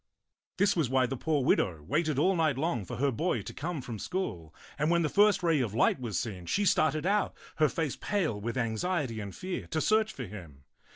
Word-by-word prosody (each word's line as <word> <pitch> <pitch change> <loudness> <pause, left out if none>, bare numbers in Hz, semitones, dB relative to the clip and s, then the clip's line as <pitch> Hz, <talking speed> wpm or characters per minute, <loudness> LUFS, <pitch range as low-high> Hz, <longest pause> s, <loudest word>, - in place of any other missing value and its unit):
This 200 +1 +3
was 160 -8 +1
why 130 0 +3
the 130 +2 -3
poor 145 +1 0
widow 85 -10 +1
waited 155 - 0
all 185 +7 +3
night 155 -5 +2
long 135 - -1
for - - -6
her 140 +1 +1
boy 125 - -1
to - - -8
come 160 0 -4
from 115 -4 -6
school; 90 - -4 0.3
and 150 +2 +2
when 170 0 +3
the 155 - +1
first 205 0 +4
ray 165 -3 +3
of 110 -4 -2
light 115 - +3
was 115 -7 -3
seen, 95 -7 -4
she 205 - +1
started 155 -3 +2
out, 205 +2 +1 0.2
her 155 -2 +4
face 160 -5 -2
pale 165 - -1
with 120 +4 -3
anxiety 120 +2 -1
and 100 -2 -6
fear, 185 0 -5
to 160 - -1
search 215 +5 +2
for 125 - -6
him. 85 -9 -11
145 Hz, 220 wpm, -30 LUFS, 115-175 Hz, 0.3 s, first